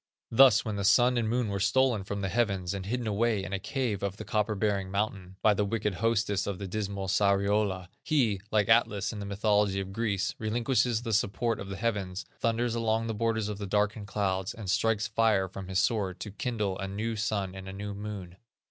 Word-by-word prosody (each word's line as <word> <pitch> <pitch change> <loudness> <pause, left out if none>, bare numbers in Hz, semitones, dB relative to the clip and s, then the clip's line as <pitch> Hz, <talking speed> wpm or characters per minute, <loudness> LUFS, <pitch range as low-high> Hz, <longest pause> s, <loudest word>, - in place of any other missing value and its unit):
Thus, 130 0 +6
when 105 -2 -2
the 100 - -2
Sun 120 +5 +5
and 110 -2 0
Moon 120 -1 0
were 100 0 -2
stolen 110 +2 +2
from 100 +1 -4
the 95 - -1
heavens, 100 -5 0
and 95 -1 -5
hidden 120 +2 -2
away 110 -1 +1
in 95 - -5
a 100 - -1
cave 120 -2 -2
of 100 0 -3
the - - -7
copper 105 0 0
bearing 100 -2 0
mountain, 100 -2 -3
by 105 - +6
the 105 - +1
wicked 105 0 -1
hostess 105 0 0
of 100 -2 -2
the 100 - -5
dismal 100 -1 -3
Sariola, 100 -1 +2
he, 115 -11 +1
like 105 -2 +2
Atlas 115 -2 +3
in 105 - -6
the 100 - -5
mythology 100 -1 +2
of 95 0 -5
Greece, 100 -2 -1
relinquishes 120 +1 +1
the 115 -2 -2
support 110 +2 +1
of 100 - -7
the 95 - -4
heavens, 100 -5 -2
thunders 115 +1 0
along 115 -1 0
the 115 - -2
borders 110 -1 0
of 105 -1 -5
the 100 - -4
darkened 105 +1 0
clouds, 95 -2 -1
and 105 -5 -3
strikes 110 +1 +1
fire 110 -4 +2
from 95 0 -8
his 95 0 -2
sword 95 -4 +1
to 105 - -5
kindle 105 -3 -2
a 95 - -3
new 110 +4 -3
sun 105 -3 -1
and 95 0 -8
a - - -5
new 100 +1 -5
moon. 100 -3 -7
105 Hz, 215 wpm, -29 LUFS, 95-115 Hz, -, Thus